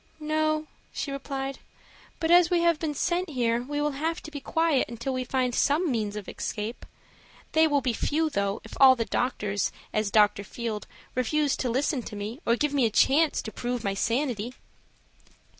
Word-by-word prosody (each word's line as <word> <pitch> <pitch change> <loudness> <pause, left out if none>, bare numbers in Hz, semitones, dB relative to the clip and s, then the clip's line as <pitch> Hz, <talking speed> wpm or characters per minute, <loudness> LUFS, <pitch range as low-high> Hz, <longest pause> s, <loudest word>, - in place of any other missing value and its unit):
"No," 310 0 0 0.3
she 280 - -4
replied; 275 -1 -4 0.6
"but 325 0 0
as 350 -1 +7
we 350 -2 +2
have 340 -2 +3
been 305 -3 -2
sent 355 +4 0
here 240 -4 +1
we 290 +4 -4
will 295 0 +1
have 320 +5 -2
to 310 - -9
be 290 - -5
quiet 320 -2 +1
until 235 +3 -4
we 255 0 -1
find 250 -1 0
some 300 +5 +2
means 215 -4 -1
of 210 -2 -6
escape. 220 +2 -5 0.6
They 320 0 +5
will 290 -2 +2
be 250 -2 0
few, 315 +7 0
though, 200 -4 -1
if - - -11
all 260 -1 +9
the 230 -2 -1
doctors, 210 -5 -1 0.2
as 215 -1 +1
Dr. 205 -1 +4
Field, 220 0 -5 0.3
refuse 285 +3 +1
to 255 - -1
listen 265 +2 0
to 215 - -8
me 210 +5 -5
or 235 - +4
give 295 +3 0
me 265 -5 +3
a - - -1
chance 290 +8 +3
to 220 - -6
prove 245 0 -3
my 195 - 0
sanity." 240 +2 -1
265 Hz, 190 wpm, -27 LUFS, 230-305 Hz, 0.6 s, all